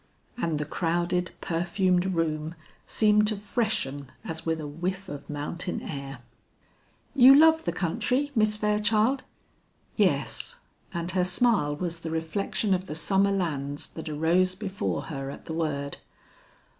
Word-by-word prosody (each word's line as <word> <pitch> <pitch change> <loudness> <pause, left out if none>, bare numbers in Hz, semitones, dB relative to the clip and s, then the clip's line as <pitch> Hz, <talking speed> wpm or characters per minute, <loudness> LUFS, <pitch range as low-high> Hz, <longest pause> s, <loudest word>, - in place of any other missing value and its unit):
And 165 -10 -1
the 150 - -2
crowded 175 +2 0
perfumed 180 +2 +1
room 160 0 -1 0.3
seemed 210 -1 +4
to 215 -1 +3
freshen 195 - -2
as 165 0 -5
with 160 0 0
a 155 - -5
whiff 180 +6 -4
of 145 -4 -8
mountain 150 +5 -3
air. 140 -2 -6 1.0
"You 270 0 +9
love 320 +2 +6
the - - +1
country, 250 - 0
Miss 215 -3 +2
Fairchild?" 210 +4 +2 0.7
"Yes;" 485 - 0 0.3
and 170 0 -3
her 185 0 +2
smile 185 -5 +2
was 170 +1 -3
the 165 - -5
reflection 165 +5 -1
of 185 0 -1
the 150 - -5
summer 195 +4 +2
lands 145 -7 -2
that 160 -1 -7
arose 170 +5 +2
before 200 0 -3
her 135 -3 -5
at - - -9
the 160 - -5
word. 145 -3 -2
175 Hz, 140 wpm, -27 LUFS, 155-210 Hz, 1.0 s, You